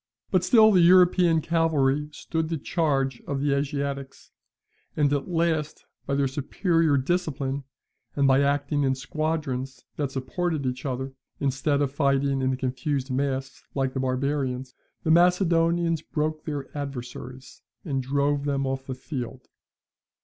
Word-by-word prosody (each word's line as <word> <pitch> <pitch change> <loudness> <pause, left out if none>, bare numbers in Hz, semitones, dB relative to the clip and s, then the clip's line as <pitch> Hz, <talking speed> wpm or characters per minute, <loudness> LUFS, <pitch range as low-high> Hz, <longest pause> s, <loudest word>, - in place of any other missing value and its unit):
But 185 -3 +3
still 220 -2 +6
the 185 -3 +5
European 175 -1 +5
cavalry 150 -3 +1
stood 160 +1 -3
the 165 - -1
charge 135 -5 0
of 140 -1 -2
the 140 0 +1
Asiatics, 140 -1 -3 0.7
and 145 -1 +3
at 140 -1 -1
last, 165 -3 -1 0.2
by 140 - 0
their 140 -1 +2
superior 155 +3 +1
discipline, 140 -3 -1 0.5
and 140 -1 +3
by 135 +1 +5
acting 145 +1 +1
in 135 -1 +2
squadrons 135 -3 -3
that 145 -3 -1
supported 145 +3 -2
each 130 +2 -3
other, 130 +1 -3 0.3
instead 140 +1 +1
of 135 - -1
fighting 140 -1 +1
in 130 0 +1
a 130 - -2
confused 130 +1 -2
mass 135 0 -2
like 135 -1 0
the 130 - -2
barbarians, 130 -1 -1 0.3
the 160 - +2
Macedonians 170 -1 +3
broke 155 0 -3
their 145 -3 -5
adversaries, 130 -2 -7 0.2
and 135 -3 -1
drove 140 +2 0
them 140 -1 0
off 135 0 -3
the 130 - -4
field. 130 -1 -6
140 Hz, 140 wpm, -26 LUFS, 135-160 Hz, 0.7 s, still